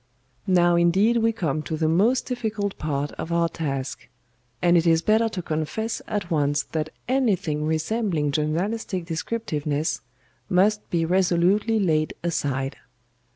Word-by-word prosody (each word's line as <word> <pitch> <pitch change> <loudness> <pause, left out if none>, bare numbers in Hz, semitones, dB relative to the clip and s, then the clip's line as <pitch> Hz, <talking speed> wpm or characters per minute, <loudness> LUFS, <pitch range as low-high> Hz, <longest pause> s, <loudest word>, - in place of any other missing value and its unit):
"Now 175 -2 +4
indeed 190 +7 +3
we 225 0 +3
come 160 -9 -2
to 155 +1 -4
the 160 0 +1
most 205 +11 +3
difficult 220 -5 -2
part 145 -1 -2
of 165 - -4
our 170 0 +2
task, 140 -5 -4 0.5
and 175 0 +4
it 170 0 +3
is 165 0 +4
better 220 +1 +3
to 185 -5 -5
confess 160 +9 -2
at 200 -4 -3
once 145 -2 +1
that 155 -1 -3 0.2
anything 200 - +1
resembling 160 -1 0
journalistic 175 +6 -1
descriptiveness 160 -4 -2 0.5
must 210 +3 +2
be 165 -2 +1
resolutely 185 +5 +2
laid 155 -5 +1
aside. 140 -5 -1
170 Hz, 135 wpm, -24 LUFS, 155-210 Hz, 0.5 s, Now